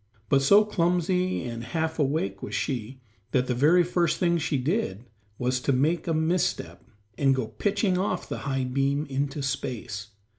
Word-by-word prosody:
But 135 - +4
so 200 +10 +6
clumsy 180 -1 +1
and 115 -2 -5
half 160 +4 -2
awake 135 -10 0
was 105 - -5
she 130 -1 -3 0.3
that 125 -1 +3
the 125 - -1
very 155 +8 +5
first 170 -1 +1
thing 170 -1 +2
she 150 -2 0
did 125 - -1 0.3
was 125 +1 0
to 140 - 0
make 155 +6 +1
a 165 - +1
misstep 160 - -1 0.4
and 135 -1 +4
go 130 -3 -1
pitching 200 -2 0
off 185 -2 -1
the - - -4
high 135 -1 -2
beam 135 +3 0
into 140 +1 -2
space. 125 -6 -4
140 Hz, 170 wpm, -26 LUFS, 125-170 Hz, 0.4 s, so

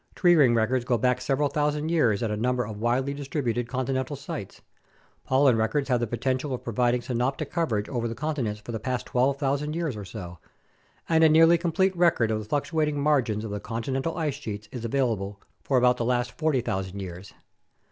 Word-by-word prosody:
Tree 175 -2 +5
ring 135 -8 +5
records 120 +3 +1
go 125 -1 +1
back 125 +2 +1
several 135 +3 +1
thousand 150 +2 -1
years 120 -11 +2
at 110 - -1
a - - 0
number 125 +3 0
of 105 -1 -7
widely 130 +4 +1
distributed 135 -4 -2
con 130 0 -2
tinental 130 +2 -2
sites, 140 - -7 0.6
pollen 130 -2 +4
records 115 +6 0
have 125 -2 +3
the 120 - -1
potential 130 +4 -1
of - - -10
providing 120 +1 +1
synoptic 125 +2 -2
coverage 115 -12 -1
over 120 -3 -2
the 115 - -5
continents 135 -8 -2
for 105 +3 -8
the 110 - -3
past 125 +2 -3
12,000 140 +3 0
years 165 -7 -2
or 105 - -6
so, 90 -4 -8 0.7
and 160 -1 +4
a 160 - +7
nearly 165 +2 +6
complete 180 +3 +1
record 170 -10 +3
of 110 - 0
the 110 - -7
fluctuating 150 +3 0
margins 130 -8 +1
of 105 - -5
the 105 - -3
continental 130 - -3
ice 155 -4 0
sheets 105 -7 -7
is 125 -3 -6
available 110 -6 -1 0.2
for 135 - +1
about 125 0 +4
the 120 - -1
last 120 0 0
40,000 105 - -1
years. 90 0 -8
125 Hz, 195 wpm, -26 LUFS, 115-145 Hz, 0.7 s, a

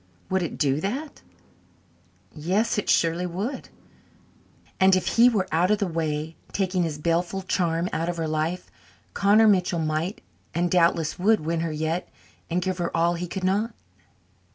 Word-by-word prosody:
Would 190 0 +2
it 170 - -4
do 145 -1 +1
that? 270 - -4 1.1
Yes, 195 +9 0
it - - -4
surely 170 +2 +2
would. 205 +10 -4 1.1
And 190 0 +6
if 185 - 0
he 235 +2 +6
were 200 -6 0
out 170 +4 +2
of 210 - +3
the 200 - 0
way, 160 -2 -2 0.2
taking 185 -2 0
his 160 -3 -2
baleful 170 +4 -1
charm 170 -2 0
out 165 +2 -1
of 175 - -3
her 165 -1 -2
life, 155 +3 -2 0.4
Connor 210 +3 +5
Mitchell 180 -3 +3
might 160 +4 -2 0.3
and 175 0 0
doubtless 170 -3 +2
would 215 +2 +3
win 165 +2 -1
her 165 -1 -2
yet 160 +3 -2 0.4
and 175 +2 0
give 185 -1 -2
her 175 - 0
all 170 +1 +3
he 175 +1 -4
could 190 +2 -5
not. 205 +5 0
175 Hz, 165 wpm, -25 LUFS, 165-195 Hz, 1.1 s, And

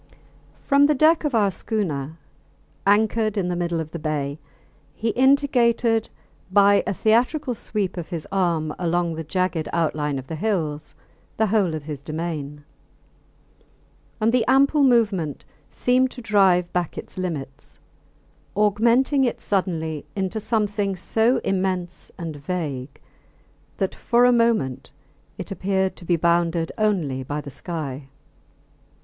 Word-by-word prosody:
From 280 0 +5
the 300 - +2
deck 315 +3 +4
of 285 -5 0
our 205 -3 +3
schooner, 160 - -3 0.7
anchored 215 +1 +2
in 180 -2 0
the 175 - -1
middle 170 -1 -1
of 155 -1 -5
the 170 - -5
bay, 150 -2 -3 0.6
he 225 - -1
indicated 245 -4 +2 0.4
by 200 +1 +5
a 200 - 0
theatrical 245 - +2
sweep 205 -4 -3
of 170 - -5
his 170 -4 -5
arm 170 -5 0
along 175 -1 0
the 160 0 -5
jagged 180 0 -1
outline 150 -3 0
of 130 - -6
the 160 - -6
hills 160 -7 -2 0.4
the 220 - +3
whole 195 -6 +1
of 155 - -6
his 145 -2 -6
domain; 155 -2 -5 1.6
and 225 +1 +2
the 250 -2 +3
ample 275 +3 +4
movement 205 - +2 0.2
seemed 255 +1 +2
to 250 - -10
drive 190 -5 +3
back 175 -2 -2
its - - -8
limits, 145 -6 -6 0.8
augmenting 235 +7 +3
it 245 - 0
suddenly 160 -6 -2
into 195 +2 -2
something 205 -3 -1
so 225 +7 +1
immense 185 -2 -2
and 165 -4 -6
vague 145 -4 -4 0.8
that 195 - -1
for 240 0 +2
a 250 - +6
moment 230 - +1 0.5
it - - -7
appeared 190 0 0
to 175 - -11
be 175 - +2
bounded 170 0 +1
only 175 -12 0
by 145 +3 -4
the 145 -1 -8
sky. 140 -3 -5
185 Hz, 135 wpm, -23 LUFS, 160-220 Hz, 1.6 s, a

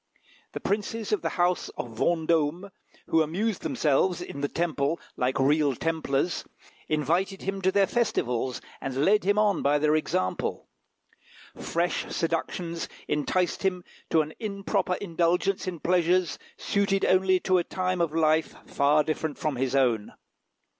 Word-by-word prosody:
The - - -4
princes 210 +2 -2
of 210 - +1
the - - -1
house 175 0 +1
of 120 - -4
Vendôme, 165 - 0 0.3
who 165 - +3
amused 185 +7 -1
themselves 165 +5 +1
in 140 - -7
the 145 - +1
Temple 165 -1 -1 0.2
like 130 +1 0
real 145 0 +3
Templars, 160 +1 -1 0.5
invited 170 +6 0
him 195 0 -3
to 190 0 +3
their 200 0 +4
festivals, 130 - -1 0.2
and 135 +2 -1
led 210 +2 +4
him 205 +1 +2
on 210 -3 +3
by 145 +1 +3
their 150 +1 +2
example. 95 -11 -1 0.9
Fresh 170 +1 -2
seductions 165 0 -2 0.2
enticed 175 +5 0
him 185 -2 0 0.3
to 160 -1 +4
an 155 +1 -9
improper 200 -3 -1
indulgence 180 +2 0
in 175 -3 -4
pleasures 180 0 +2 0.2
suited 200 -1 +1
only 185 0 +4
to 185 0 +3
a - - 0
time 185 0 -1
of 165 -3 +1
life 160 0 +2
far 150 +1 +3
different 155 0 -3
from 150 -3 -1
his 130 +1 -1
own. 120 -6 +1
170 Hz, 145 wpm, -27 LUFS, 150-190 Hz, 0.9 s, their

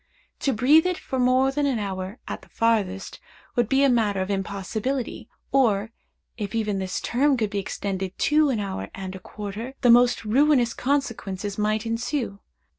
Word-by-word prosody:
To 275 - +1
breathe 285 +9 +5
it 365 -1 -1
for 260 - -4
more 255 +2 +3
than 290 +1 0
an 265 -4 +1
hour, 195 0 -4
at - - -5
the - - -19
farthest, 205 -5 0 0.4
would 240 -2 +1
be 270 +1 +3
a - - +6
matter 220 -6 +2
of 190 +2 -2
impossibility, 205 +6 -3 0.2
or, 225 -5 +2 0.5
if 210 -1 -4
even 210 -3 0
this 185 -1 -2
term 270 +3 +2
could 215 -3 -1
be 205 - -1
extended 190 -1 -4
to 300 0 +3
an 240 -5 0
hour 195 -2 -4
and 190 -1 -6
a 190 - -8
quarter, 210 +7 -7
the 245 -3 +6
most 245 -1 +5
ruinous 250 0 +3
consequences 215 -7 -2
might 215 +1 0
ensue. 230 -2 -2
225 Hz, 175 wpm, -25 LUFS, 200-260 Hz, 0.5 s, a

